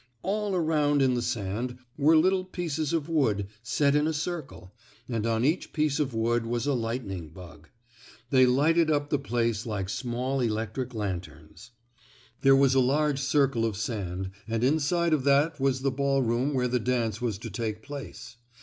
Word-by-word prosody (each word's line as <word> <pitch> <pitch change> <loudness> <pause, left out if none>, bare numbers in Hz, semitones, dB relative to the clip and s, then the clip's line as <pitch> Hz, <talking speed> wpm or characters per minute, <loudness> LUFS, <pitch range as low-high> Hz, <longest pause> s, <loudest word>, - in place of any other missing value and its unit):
All 205 0 -1
around 150 -4 +2
in 130 -1 +3
the 120 - 0
sand 115 +3 -3 0.2
were 155 +2 +4
little 185 +3 +3
pieces 160 -5 -3
of 165 -3 -1
wood, 120 -12 +1 0.2
set 140 +5 +1
in 150 +1 +3
a 160 - 0
circle, 145 - -5 0.3
and 115 -3 -2
on 115 +1 +1
each 160 +6 0
piece 155 -1 +1
of 145 -3 0
wood 115 +1 +1
was 120 +2 -1
a 145 - +1
lightning 115 - -3
bug. 85 +1 -13 0.6
They 130 -2 +6
lighted 155 +6 +3
up 145 -1 0
the 145 - +2
place 115 -1 -1
like 100 -4 -3
small 125 +2 -2
electric 115 +2 -2
lanterns. 90 -1 -6 0.7
There 135 0 +6
was 135 -1 +4
a 135 - +4
large 140 +2 +2
circle 135 -3 +2
of 110 -4 -1
sand, 95 -4 -3 0.2
and 115 +1 -1
inside 160 +5 +2
of 145 -4 +1
that 145 +3 +3
was 135 -1 +1
the 135 - +2
ballroom 135 0 0
where 125 -1 +1
the 125 0 0
dance 115 -2 -1
was 115 -5 -1
to 115 +2 -8
take 110 0 -4
place. 135 -3 -9
130 Hz, 175 wpm, -27 LUFS, 115-145 Hz, 0.7 s, They